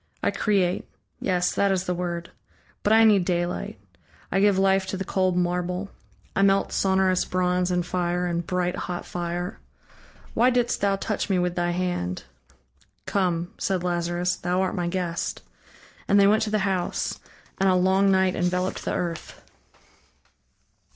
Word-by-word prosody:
I - - +2
create. 190 -4 0 0.3
Yes, 180 -2 0
that 200 -1 +2
is 185 -1 +1
the 180 - -1
word... 175 -1 -4 0.5
but 205 - +1
I 225 +1 +7
need 210 -4 +5
daylight. 175 - -2 0.5
I 195 - +2
give 200 -1 +4
life 195 0 +3
to 190 - -3
the 190 - -4
cold 185 -1 +1
marble, 180 +2 -1 0.4
I - - +2
melt 195 0 +3
sonorous 190 -1 +2
bronze 180 0 0
in 180 -1 +1
fire, 175 0 -1
in 170 -1 -1
bright 180 +1 -1
hot 175 -1 -4
fire.... 175 +1 -4 0.7
Why 240 +3 +4
didst 245 -1 0
thou 200 -1 +2
touch 205 +1 -3
me 190 - +2
with 180 0 0
thy 175 -1 0
hand?" 175 - -2 0.8
"Come" 175 -3 -1
said 185 -2 -1
Lazarus 175 +1 0
"Thou 180 +1 -1
art 190 - 0
my 175 -1 -2
guest." 175 -1 -3 0.6
And 200 - +4
they 200 - +6
went 215 +2 +4
to 220 - 0
the 210 -2 0
house. 185 -3 -1 0.4
And 195 0 +3
a 185 - +4
long 190 +2 +3
night 190 -1 +3
enveloped 180 +1 -1
the - - -2
earth. 170 -2 -4
180 Hz, 160 wpm, -25 LUFS, 175-195 Hz, 0.8 s, I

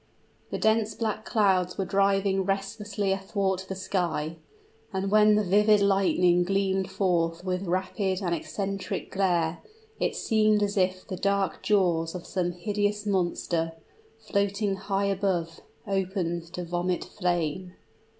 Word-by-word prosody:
The - - -3
dense 220 0 +2
black 215 -1 -2
clouds 190 -4 +2
were 195 - -1
driving 195 0 +2
restlessly 195 +1 -2
athwart 195 -1 -1
the 190 - -3
sky; 170 -4 -2 0.5
and 195 0 -2
when 210 0 +6
the 210 - +2
vivid 210 +2 +4
lightning 190 -3 +3
gleamed 195 0 0
forth 175 -3 0
with 185 +1 -2
rapid 185 +1 -1
and 175 -2 0
eccentric 195 +2 -4
glare, 175 -4 +1 0.4
it - - 0
seemed 215 -1 +2
as 205 +1 -1
if 185 -1 0
the 185 - -4
dark 200 0 0
jaws 175 -5 +1
of 180 - -6
some 175 -2 -1
hideous 205 +3 -1
monster, 175 -4 0 0.4
floating 200 -2 0
high 195 +1 -1
above, 185 -4 -1 0.3
opened 180 -3 -2
to 180 - -4
vomit 175 +1 -1
flame. 180 -1 -2
195 Hz, 130 wpm, -27 LUFS, 180-200 Hz, 0.5 s, when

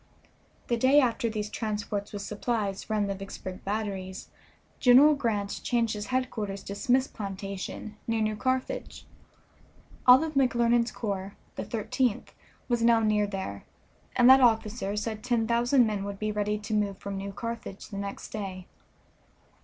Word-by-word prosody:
The 235 - +1
day 260 +5 +5
after 235 -3 +1
these 210 -1 -4
transports 210 -2 -3
with 205 -1 -5
supplies 210 -1 -2
ran 215 -1 +1
the 200 - -1
Vicksburg 190 -1 -8
batteries 195 -2 -4 0.5
General 270 +5 +7
Grant 215 -7 -2
changed 235 -2 +1
his 210 -1 -5
headquarters 220 -6 -2
to 200 - -6
Smith's 255 +5 +2
plantation, 200 0 -6
near 225 -1 +1
New 215 0 0
Carthage. 255 +3 -2 1.0
All 250 +4 +9
of 320 -1 -3
McClernand's 240 -3 +3
corps, 200 -2 -4 0.2
the - - -3
Thirteenth, 230 +1 -1 0.3
was 240 -2 +1
now 230 0 +5
near 210 -1 +2
there, 190 - -5 0.5
and 245 - +5
that 265 +1 +9
officer 220 -3 +2
said 215 0 -3
ten 240 -2 +1
thousand 240 +2 +3
men 210 -3 -2
would 200 0 -5
be 215 +1 -2
ready 210 0 -1
to 210 +1 -5
move 205 -2 0
from 200 0 -6
New 195 +1 -4
Carthage 230 -2 -6
the 200 - -6
next 200 0 -6
day. 190 -4 -5
215 Hz, 155 wpm, -28 LUFS, 200-240 Hz, 1.0 s, All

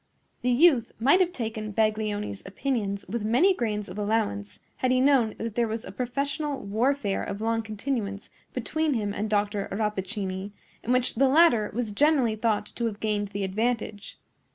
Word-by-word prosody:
The 250 - 0
youth 250 -2 +4
might 275 +10 +5
have 360 -2 +3
taken 220 - -4
Baglioni's 215 -2 0
opinions 200 -2 -2
with 220 +3 -3
many 250 - +4
grains 210 - -2
of 205 - -7
allowance 205 - -1 0.2
had 255 - 0
he 255 0 +3
known 260 -5 +3
that 225 -1 -4
there 235 +1 +1
was 220 +1 -4
a - - -7
professional 280 +6 -2
warfare 220 0 0
of 200 - -4
long 225 +1 0
continuance 215 -2 -4 0.2
between 305 +4 -1
him 205 -3 -1
and 210 +1 -2
Dr. 205 -1 0
Rappaccini, 200 -1 -3 0.3
in 240 - -2
which 250 0 +2
the 270 +4 +3
latter 265 -7 +5
was 235 -3 -1
generally 260 -1 +3
thought 215 -1 0
to 235 +1 -3
have 210 -2 -5
gained 210 -1 0
the 200 0 -4
advantage. 215 +1 -2
220 Hz, 170 wpm, -27 LUFS, 205-250 Hz, 0.3 s, might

